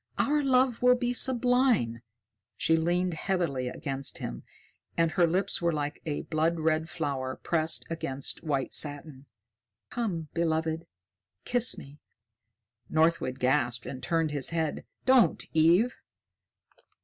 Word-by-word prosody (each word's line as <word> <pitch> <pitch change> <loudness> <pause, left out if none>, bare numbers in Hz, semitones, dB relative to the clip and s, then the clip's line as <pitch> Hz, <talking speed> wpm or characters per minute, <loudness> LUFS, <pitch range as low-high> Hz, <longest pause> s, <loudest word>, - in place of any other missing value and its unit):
"Our 295 +1 +2
love 260 -3 +2
will 250 0 +6
be 245 0 -1
sublime." 245 - +2 0.6
She 165 - +2
leaned 175 +2 0
heavily 160 -7 -1
against 135 +1 -3
him, - - -6 0.6
and 165 -1 +2
her 175 0 +3
lips 180 +3 0
were 170 0 +2
like 150 -1 -3
a 150 - -2
blood 165 +1 0
red 160 +1 0
flower 135 -5 -3
pressed 160 -1 0
against 140 -5 -1
white 140 -4 -2
satin. 145 -2 -2 0.6
"Come, 175 -10 -3
beloved, 160 -1 -1 0.6
kiss 245 -1 +3
me!" 140 +2 -12 0.9
Northwood 160 -5 +1
gasped 125 -2 0
and 130 -2 -7
turned 165 +2 0
his 145 -3 +1
head. 160 -2 -2 0.2
"Don't, 255 -10 +4
Eve!" 170 +10 +3
160 Hz, 125 wpm, -28 LUFS, 145-185 Hz, 0.9 s, will